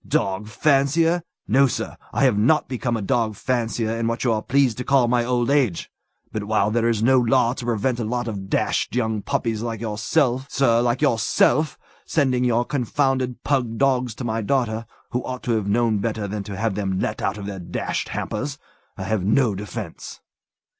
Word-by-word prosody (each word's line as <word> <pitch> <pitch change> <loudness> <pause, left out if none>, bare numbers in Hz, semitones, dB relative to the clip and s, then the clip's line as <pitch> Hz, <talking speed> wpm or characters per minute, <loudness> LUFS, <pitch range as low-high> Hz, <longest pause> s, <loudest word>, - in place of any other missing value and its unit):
Dog 95 +2 0
fancier! 155 +7 +2 0.3
No, 135 +5 +5
sir! 120 - -4 0.2
I - - 0
have 130 -5 +4
not 125 +10 +3
become 120 -2 -2
a 105 - -4
dog 110 +2 0
fancier 115 -1 -1
in 115 - 0
what 115 0 -2
you 120 -3 +2
are 110 - -1
pleased 135 -3 +2
to - - -2
call 135 -3 +3
my 120 0 +2
old 120 +1 0
age! 130 - +1 0.4
But 105 -2 -3
while 105 -1 +1
there 115 +1 +2
is 110 -2 0
no 130 +2 +5
law 120 0 +3
to 125 - -7
prevent 120 +1 0
a - - -1
lot 120 +2 -2
of 100 -3 -5
dashed - - 0
young 110 -3 0
puppies 110 +1 -1
like 115 -2 -3
yourself, 120 +5 0
sir 120 -4 +3
like 120 +3 0
yourself 135 +3 +2 0.3
sending 130 -5 +1
your 120 -1 +2
confounded 130 -1 -1
pug 125 -5 0
dogs 130 -3 +1
to - - -6
my 115 -1 -1
daughter, 115 -1 -1 0.2
who 125 - -1
ought 125 -3 -5
to 120 - -1
have 110 -3 0
known 110 0 +2
better 110 0 -2
than 105 +1 -4
to 100 -1 -6
have 110 -1 -1
let 95 -2 -1
them - - -8
out 100 - -1
of 100 - -7
their 100 -1 -5
dashed 85 - -3
hampers, 140 +6 -3 0.4
I 95 - -4
have 100 -1 -1
no 110 +3 +3
defence. 105 -2 -7
120 Hz, 195 wpm, -23 LUFS, 110-130 Hz, 0.4 s, No